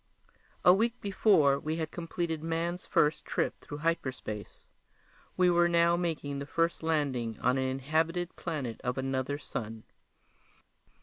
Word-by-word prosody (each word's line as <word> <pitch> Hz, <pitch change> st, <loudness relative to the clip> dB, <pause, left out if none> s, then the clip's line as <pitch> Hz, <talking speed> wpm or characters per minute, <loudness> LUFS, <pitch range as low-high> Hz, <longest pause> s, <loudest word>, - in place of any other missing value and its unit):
A 180 Hz, -, +9 dB
week 230 Hz, +5 st, +1 dB
before 175 Hz, -9 st, +3 dB
we 155 Hz, +2 st, -2 dB
had 160 Hz, -1 st, -3 dB
completed 165 Hz, -2 st, -3 dB
man's 165 Hz, +2 st, -2 dB
first 150 Hz, +1 st, +2 dB
trip -, -, -2 dB
through 145 Hz, -, -7 dB
hyperspace. 130 Hz, -10 st, -3 dB, 0.7 s
We 180 Hz, -1 st, +5 dB
were 175 Hz, 0 st, +4 dB
now 170 Hz, 0 st, +4 dB
making 160 Hz, -5 st, -2 dB
the 140 Hz, -, -6 dB
first 165 Hz, +2 st, 0 dB
landing 140 Hz, -8 st, -1 dB
on 125 Hz, +1 st, +2 dB
an 130 Hz, -, 0 dB
inhabited 160 Hz, +6 st, -1 dB
planet 140 Hz, -9 st, -4 dB
of 125 Hz, +1 st, -1 dB
another 135 Hz, +1 st, -1 dB
sun. 110 Hz, -6 st, -6 dB
160 Hz, 135 wpm, -30 LUFS, 135-170 Hz, 0.7 s, A